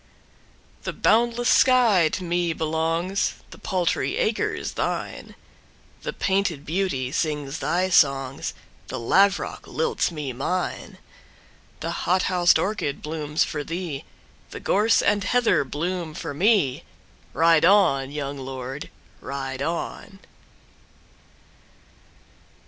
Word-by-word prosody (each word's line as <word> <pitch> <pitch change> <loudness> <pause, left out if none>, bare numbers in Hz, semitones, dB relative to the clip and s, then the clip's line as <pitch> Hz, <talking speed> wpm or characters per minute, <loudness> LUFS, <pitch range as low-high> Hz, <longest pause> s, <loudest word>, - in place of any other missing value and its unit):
The - - -4
boundless 235 +1 +2
sky 230 -10 +5
to 185 - -2
me 175 -1 0
belongs, 165 +4 -1 0.2
The - - -12
paltry 185 - -1
acres 485 -3 -1
thine; - - -4 0.7
The - - -3
painted 190 -7 -1
beauty 155 -7 -1
sings 150 0 -2
thy 185 +2 0
songs, 135 -6 +2 0.3
The 130 - -5
lavrock 195 +12 +2
lilts 475 -1 0
me 150 -6 -5
mine; 175 +9 -3 0.8
The 165 - -2
hot 180 +2 +1
housed 180 -1 +4
orchid 185 -9 -2
blooms 150 -1 -1
for 150 -1 -4
thee, 165 -3 -5 0.5
The - - -8
gorse 215 +3 +3
and 205 -1 +2
heather 240 -6 +2
bloom 165 +3 -4
for - - -5
me, 180 - +2 0.5
Ride 165 -1 +4
on, 165 -8 +4
young 140 -1 -5
lord, 130 +1 -6 0.3
ride 135 0 -5
on! 170 +5 -4
165 Hz, 110 wpm, -24 LUFS, 145-190 Hz, 0.8 s, sky